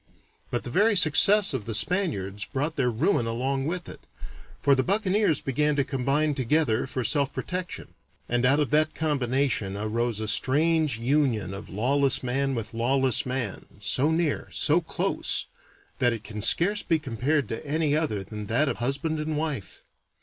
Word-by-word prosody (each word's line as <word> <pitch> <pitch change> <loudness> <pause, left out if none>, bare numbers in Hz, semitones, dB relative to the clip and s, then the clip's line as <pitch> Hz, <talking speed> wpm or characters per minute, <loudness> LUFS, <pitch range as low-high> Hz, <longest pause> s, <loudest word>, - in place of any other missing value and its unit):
But 120 - -2
the 120 - -6
very 205 - +3
success 195 +4 +5
of 120 -6 -3
the 115 - -4
Spaniards 105 - -1
brought 150 +3 -3
their 125 -3 +1
ruin 120 - +1
along 135 +4 -2
with 175 +1 -4
it, - - -9 0.6
for 140 - +3
the 135 - +3
buccaneers 200 - +1
began 150 +2 0
to 140 - +2
combine 140 +3 0
together 130 -2 +1
for 130 -1 -3
self 140 +4 +1
protection, 180 -1 -5 0.3
and 120 0 0
out 135 +4 +4
of 145 -6 0
that 155 +1 +2
combination 130 -8 -1
arose 110 +1 -2
a 110 - -3
strange 150 +4 +3
union 120 -6 0
of 100 +2 -8
lawless 135 +7 +1
man 135 +2 -1
with 115 -1 -5
lawless 130 +2 +1
man, 125 -6 -4
so 130 +8 +1
near, 160 -2 -1
so 160 +4 +2
close, 165 - -2 0.5
that 120 -1 +3
it 110 -2 -7
can 105 -1 -7
scarce 200 - +2
be 165 - +1
compared 140 0 -1
to 115 - -5
any 150 0 0
other 145 -11 -1
than 105 +2 -8
that 130 +8 +2
of - - -2
husband 140 +6 -2
and 155 0 -3
wife. 150 -10 -4
135 Hz, 170 wpm, -26 LUFS, 115-155 Hz, 0.6 s, success